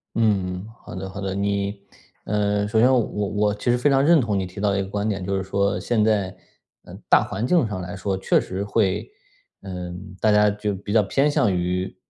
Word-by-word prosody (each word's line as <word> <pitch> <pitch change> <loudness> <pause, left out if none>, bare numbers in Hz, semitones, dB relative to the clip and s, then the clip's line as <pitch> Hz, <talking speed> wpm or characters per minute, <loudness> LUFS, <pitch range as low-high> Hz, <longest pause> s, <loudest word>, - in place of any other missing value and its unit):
嗯， 95 -4 0 0.2
好 - - -9
的 95 +1 -5
好 100 +1 -7
的。 95 -1 -3
你 100 0 -1 0.5
呃， 105 0 0
首 110 +1 +1
先 125 +3 +5
我 130 - +4
我 105 0 -1
其 105 +4 -3
实 120 - +2
非 135 +4 +2
常 135 0 +3
认 165 +1 +6
同 110 -6 0
你 95 - -2
提 95 +3 -10
到 100 -1 +1
一 100 - +1
个 95 - -4
观 100 +1 -2
点， 100 -3 -2
就 100 +1 -1
是 95 - -1
说， 100 +1 0
现 115 -3 +1
在， 100 -4 +1 0.5
嗯， - - -11
大 - - +6
环 110 +5 -3
境 160 -6 +3
上 100 -3 -4
来 90 +3 -6
说 95 0 -2
确 95 - +2
实 95 +2 -4
会 100 - 0 0.5
呃， 90 -2 -6 0.3
大 110 - +3
家 105 0 +5
就 105 0 -2
比 100 +2 -7
较 110 -2 +5
偏 140 +9 +2
向 105 -9 +2
于 90 +1 -2
100 Hz, 240 characters per minute, -23 LUFS, 95-105 Hz, 0.5 s, 认